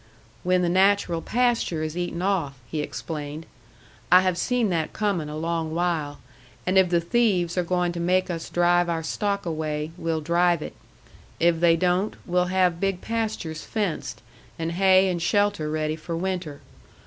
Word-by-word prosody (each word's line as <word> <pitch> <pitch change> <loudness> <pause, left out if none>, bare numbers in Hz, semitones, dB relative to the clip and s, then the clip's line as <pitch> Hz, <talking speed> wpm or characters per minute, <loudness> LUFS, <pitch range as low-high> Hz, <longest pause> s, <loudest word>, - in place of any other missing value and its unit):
"When 180 0 +2
the - - +2
natural 185 -1 +3
pasture 235 -9 0
is 155 0 -4
eaten 175 0 -3
off," 170 -9 0
he 155 - -4
explained. 150 0 -6 0.7
"I 180 +1 +8
have 185 -1 +1
seen 235 +4 0
that 160 -3 -1
coming 195 -8 -1
a 150 - -5
long 165 0 -2
while. 165 -4 -1 0.5
And 185 - 0
if 190 -2 +5
the 170 -1 +3
thieves 180 -2 +1
are 180 - +2
going 180 0 0
to 170 - -5
make 185 +2 +2
us 165 -1 -5
drive 175 0 +3
our 165 -1 -1
stock 200 +4 -2
away, 155 -1 -3
we'll 165 -1 -1
drive 170 0 +2
it. - - -7 0.7
If 170 -1 +3
they 170 -1 +5
don't, 180 +4 +1
we'll 180 0 +1
have 180 -2 +1
big 195 -1 -1
pastures 220 -9 -3
fenced, 205 -7 -3 0.3
and 165 0 -2
hay 190 +1 +4
and 175 -2 -1
shelter 205 -4 +1
ready 155 0 -1
for 165 +1 -5
winter. 180 -5 -3
175 Hz, 170 wpm, -25 LUFS, 165-185 Hz, 0.7 s, I